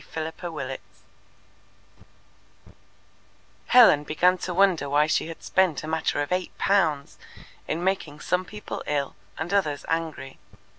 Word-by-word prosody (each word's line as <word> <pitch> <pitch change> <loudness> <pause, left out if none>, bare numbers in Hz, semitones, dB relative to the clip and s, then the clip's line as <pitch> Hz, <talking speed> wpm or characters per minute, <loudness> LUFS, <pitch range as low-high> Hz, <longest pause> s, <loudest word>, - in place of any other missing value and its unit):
Chapter 160 0 -3 0.2
27 135 -5 -5 2.9
Helen 225 -12 +7
began 180 +5 +2
to 180 - -4
wonder 175 -6 +2
why 145 +2 +3
she 160 - 0
had 165 - -9
spent 185 -6 +1
a - - -6
matter 160 -2 0
of 145 - -8
eight 180 0 -2
pounds 160 -8 +1 0.5
in 165 +3 -2
making 180 -6 -2
some 180 +3 0
people 210 +3 -7
ill 140 -2 -1 0.2
and 160 +5 -4
others 155 -8 0
angry. 160 -5 -3
160 Hz, 130 wpm, -25 LUFS, 150-185 Hz, 2.9 s, Helen